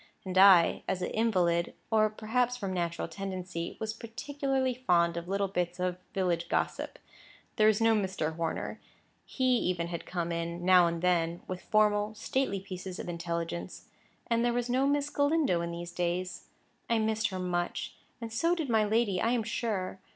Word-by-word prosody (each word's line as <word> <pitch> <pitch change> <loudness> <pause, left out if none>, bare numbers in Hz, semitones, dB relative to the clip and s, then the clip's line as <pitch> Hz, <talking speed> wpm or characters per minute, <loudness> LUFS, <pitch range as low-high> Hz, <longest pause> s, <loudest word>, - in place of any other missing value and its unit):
And 185 -1 -4
I, 185 -3 +7
as 185 -1 -1
an - - -2
invalid, 180 -7 +1 0.2
or 215 -1 +4
perhaps 240 +3 0
from 195 -5 -3
natural 170 -1 -2
tendency, 185 -3 -5
was 220 0 -3
particularly 265 +3 -2
fond 175 -9 +2
of 170 0 -5
little 200 +1 0
bits 180 -2 -2
of 180 0 -1 0.2
village 175 -3 0
gossip. - - -1 0.6
There 215 -1 +5
was 215 -1 +4
no 225 0 +4
Mr. 190 -7 -1
Horner—he 165 - -6
even 180 -9 +1
had 170 -1 -5
come 170 -2 -2
in, 170 +1 -3
now 180 -2 +7
and 170 0 -3
then, 170 -1 +1
with 185 -1 -5
formal, 210 0 +2
stately 260 -4 -1
pieces 185 -1 -7
of - - -6
intelligence—and 170 +7 -4
there 240 0 +2
was 245 0 -1
no 265 +2 +3
Miss 290 0 +1
Galindo 285 - +2
in 170 - -3
these 170 0 -6
days. 180 +1 -2 0.4
I 230 - +3
missed 220 0 +1
her 190 - -5
much. 175 -1 -2 0.3
And 230 -2 -6
so 335 +9 +2
did 320 -6 -3
my 220 -1 +4
lady, 210 -3 +1
I 230 +2 +2
am 235 -2 +1
sure. 210 -4 -2
190 Hz, 170 wpm, -30 LUFS, 175-225 Hz, 0.6 s, I